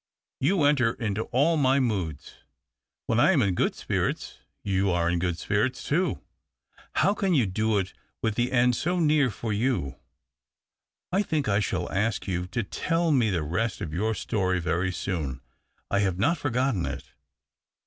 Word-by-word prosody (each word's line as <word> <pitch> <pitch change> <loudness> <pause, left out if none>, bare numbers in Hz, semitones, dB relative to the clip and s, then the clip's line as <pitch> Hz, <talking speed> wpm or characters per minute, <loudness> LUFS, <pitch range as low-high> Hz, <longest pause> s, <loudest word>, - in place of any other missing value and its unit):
" - - -65
You 160 +4 +2
enter 135 -6 +3
into 110 -2 -2
all 150 +6 +2
my 135 -1 +3
moods. 95 - -3 0.7
When 115 - +1
I 190 - +5
am 140 -7 +3
in 100 -3 +1
good - - 0
spirits, - - -2 0.2
you 95 0 +1
are 85 -2 +1
in 85 0 +1
good 90 -1 -1
spirits 120 +7 -1
too. 175 +6 0 0.7
How 200 - +3
can 195 -4 +1
you 130 -6 +4
do 110 +3 0
it 95 -1 -2 0.3
with 110 -2 0
the 120 +3 0
end 125 -1 +3
so 175 +8 0
near 150 -4 +3
for 110 +1 -4
you? 105 - -1 1.1
I 190 +3 +2
think 155 -8 -1
I 100 -1 +2
shall 95 -4 -1
ask 105 +2 -1
you 90 -1 -2
to 115 +5 -2
tell 165 - 0
me 125 -6 +3
the 85 -5 0
rest 90 +8 -1
of 75 - -5
your 110 +6 0
story 95 -2 0
very 90 +2 0
soon. 80 -9 -3 0.5
I 100 - +2
have 95 -3 +1
not 155 - +1
forgotten 125 - 0
it." 70 -2 -7
110 Hz, 175 wpm, -26 LUFS, 90-135 Hz, 1.1 s, I